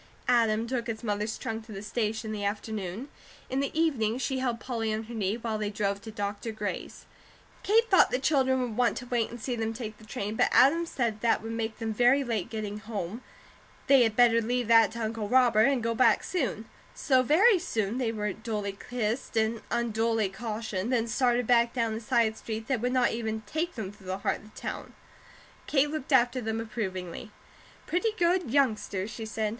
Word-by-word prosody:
Adam 230 -2 +3
took 240 0 -3
his 225 0 -4
mother's 210 0 -2
trunk 225 0 -4
to 220 - -13
the 195 -1 -7
station 220 0 -2
in - - -3
the 205 -1 -4
afternoon. 205 +2 -3 0.4
In 265 - 0
the 280 - 0
evening 245 -9 +1
she 260 +1 -1
held 245 -3 -1
Polly 230 -4 -2
on 215 +1 -2
her 230 +2 -10
knee, 205 -2 -1
while 225 -2 -3
they 210 -1 -1
drove 200 -1 -2
to 225 - -9
Dr. 205 +1 -4
Gray's. 210 -1 -5 0.6
Kate 455 +3 +3
thought 375 - +6
the - - 0
children 265 -2 +2
would 240 -4 -3
want 245 0 +2
to 250 - -6
wait 240 -2 0
and 240 - -8
see 245 +2 -3
them 225 -1 -2
take 220 -2 -7
the - - -15
train, 210 -1 -4
but - - +3
Adam 330 +6 +5
said 230 -8 -2
that 230 -2 +2
would 225 - -5
make 225 -1 -3
them 225 -2 -3
very 245 +5 +4
late 230 -5 -2
getting 215 -3 -4
home, 215 0 -5 0.6
they 275 -2 +6
had 225 -3 +2
better 230 -1 +5
leave 245 +1 -1
that 225 -1 +6
to 235 0 -4
Uncle 220 -1 -3
Robert 240 -4 +5
and 270 -4 +1
go 230 0 0
back 255 - +4
soon; 250 - -2 0.3
so 260 -3 +3
very 365 - +5
soon 230 - -2
they 235 -3 0
were 210 -3 -2
duly 210 -3 -4
kissed 235 0 -2
and 220 +1 +1
unduly 225 -2 0
cautioned; 215 0 -4
then 235 -3 +2
started 245 +1 +1
back 235 0 +3
down 230 -3 0
a 220 - -3
side 230 -2 +1
street 220 0 -6
that 260 -5 0
would 245 +1 0
not 250 -2 +3
even 220 -1 -3
take 320 +10 -3
them 205 -5 -5
through 205 -2 -16
the 185 0 -2
heart 200 - -1
of 215 - -16
the - - -9
town. - - -6 0.7
Kate 290 0 +2
looked 310 -2 -5
after 255 -1 +4
them 220 0 -2
approvingly: 190 -6 -5 0.6
"Pretty 425 +6 0
good 350 -3 +2
youngsters," 220 -7 +1
she 225 -1 -6
said. 215 0 -1
225 Hz, 205 wpm, -28 LUFS, 215-250 Hz, 0.7 s, thought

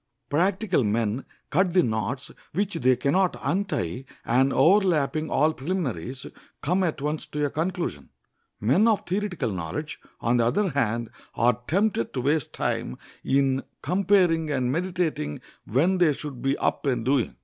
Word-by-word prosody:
Practical 185 - +2
men 110 +3 0 0.3
cut 180 +2 +2
the 180 - +6
knots 120 +4 -2 0.2
which 200 +4 0
they 130 -6 +3
can 140 +3 0
not 185 +1 +2
untie, 150 - -1 0.2
and, 130 +3 +3
overleaping 160 -5 +3
all 155 +4 +3
preliminaries, 135 - -3 0.4
come 180 +6 +1
at 155 -5 -2
once 150 +1 -2
to 150 0 -1
a 140 - -2
conclusion. 165 - -3 0.5
Men 140 - +3
of 220 -3 +2
theoretical 180 - -2
knowledge, 95 - -4 0.2
on 120 +1 +2
the 115 - +3
other 200 - +1
hand, 120 -5 -1 0.2
are 120 +1 +2
tempted 195 - +1
to 130 - 0
waste 145 +2 0
time - - -2 0.3
in 135 -1 +2 0.2
comparing 180 -2 +3
and 130 -3 0
meditating 170 - -1 0.3
when 170 - +2
they 165 -4 +4
should 140 -3 -7
be 135 +1 +1
up - - -1
and 120 -4 0
doing. 130 -2 +1
145 Hz, 150 wpm, -25 LUFS, 125-180 Hz, 0.5 s, the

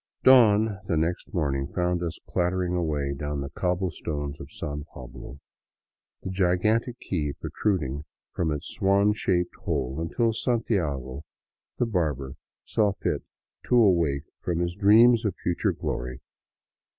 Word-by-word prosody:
Dawn, 110 -5 +6
the 80 - +1
next 85 +3 -1
morning, 70 -8 -1
found 90 +1 -1
us 85 -1 -3
clattering 90 0 0
away 75 -5 -1
down 75 0 -3
the 70 0 -5
cobble 90 +2 -1
stones 75 -2 -4
of 70 - -10
San 75 -2 -5
Pablo, 65 +1 -10 0.8
the 95 - -4
gigantic 100 +6 +1
key 75 -6 -2
protruding 75 -9 -1 0.3
from 80 -3 0
its 75 -1 -3
swan 100 +2 +3
shaped 90 -4 0
hole 70 -7 -2
until 115 +7 0
Santiago, 75 - -1 0.6
the 120 - +2
barber, 75 - -1 0.3
saw 105 -2 +2
fit - - -2 0.4
to - - +2
awake 85 - +4 0.2
from 85 -2 -1
his 85 0 -1
dreams 110 +4 +6
of 105 -5 -1
future 90 - 0
glory. 60 +2 -4
85 Hz, 135 wpm, -26 LUFS, 75-100 Hz, 0.8 s, Dawn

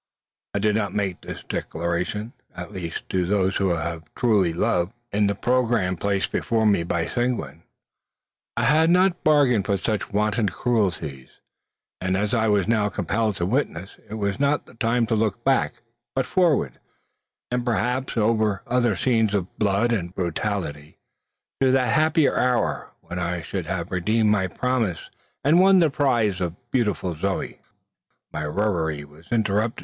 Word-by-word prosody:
I - - +2
need 105 +1 +2
not 100 -3 -1
make 95 -4 -1
this - - -8
declaration; 85 - -3 0.2
at 90 0 -7
least 85 -3 -6
to 90 -1 +1
those 95 +1 +1
who 95 -3 +1
have 80 -1 -5
truly 105 -8 +2
loved. 85 +3 0 0.2
In 105 0 +2
the 100 - 0
programme 120 -5 +1
placed 100 +2 -1
before 115 -1 0
me 100 -5 +4
by 85 0 -1
Seguin, 120 - -2 1.0
I - - +1
had 160 +3 +4
not 180 0 +3
bargained 135 -9 +3
for 100 -2 +2
such 105 +1 -2
wanton 105 +1 +1
cruelties 90 - -1 0.7
as 95 +3 0
I 110 -2 +2
was 105 -3 +2
now 110 -2 +2
compelled 105 +2 -1
to 85 - -1
witness. 95 - -2
It 110 - -5
was 100 0 -2
not 145 +1 +1
the - - -17
time 115 +1 +1
to 115 - 0
look 110 +1 -1
back, 135 -2 +2 0.4
but 130 -1 +1
forward, 155 - +1 0.7
and 125 0 0
perhaps, 125 +2 -1
over 110 -2 +1
other 120 -4 +1
scenes 110 0 +2
of 95 -2 -3
blood 105 +3 +2
and 90 -5 -2
brutality, 85 -4 -3 0.6
to 135 - +5
that 125 -3 +2
happier 155 0 +3
hour, 125 -1 0
when 85 +2 -6
I 85 -1 -2
should 95 -5 -4
have 90 -1 -3
redeemed 105 +4 +2
my 95 -3 +2
promise, 115 - -2 0.3
and 155 +5 +5
won 190 +1 +6
the 165 -5 +4
prize, 120 -10 +1 0.3
beautiful 105 -7 0
Zoe. 95 +5 -3 0.7
My 75 - -3
reverie 80 -4 -1
was 75 +3 -18
interrupted. 110 0 +1
105 Hz, 155 wpm, -24 LUFS, 90-120 Hz, 1.0 s, won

